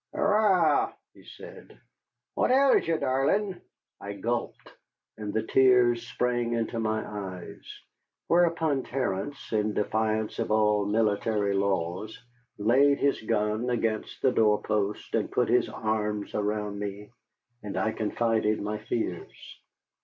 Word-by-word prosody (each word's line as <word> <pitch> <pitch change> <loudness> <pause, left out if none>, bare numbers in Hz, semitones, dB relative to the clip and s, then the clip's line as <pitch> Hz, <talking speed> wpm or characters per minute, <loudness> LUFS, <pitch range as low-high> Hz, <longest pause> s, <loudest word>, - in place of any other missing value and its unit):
"Arrah," 195 -8 +3 0.2
he - - -18
said, - - -13 0.5
"what - - +1
ails 270 -4 +4
ye, 165 -1 +1
darlin'?" 145 +9 0 0.4
I 100 - -6
gulped 115 +4 -3 0.5
and 105 -1 -5
the 110 +1 -1
tears 120 -1 +4
sprang 120 -2 -1
into 115 0 -2
my 110 -1 -1
eyes; 95 -4 -7 0.6
whereupon 165 -5 +2
Terence, 130 0 -4
in 105 -1 0
defiance 110 +1 -1
of - - -1
all 105 -1 +2
military 105 -1 +1
laws, 95 +1 -1 0.4
laid 135 +7 +4
his 140 0 +1
gun 110 +2 -1
against 115 -3 -2
the 130 - +4
doorpost 105 -2 0
and - - 0
put - - +1
his - - +3
arms 105 -1 -2
around 105 -1 -2
me, 105 +1 -6 0.5
and 105 - -6
I 110 - +1
confided 110 0 0
my 105 +1 -3
fears. 110 -4 -4
110 Hz, 125 wpm, -27 LUFS, 105-125 Hz, 0.6 s, ails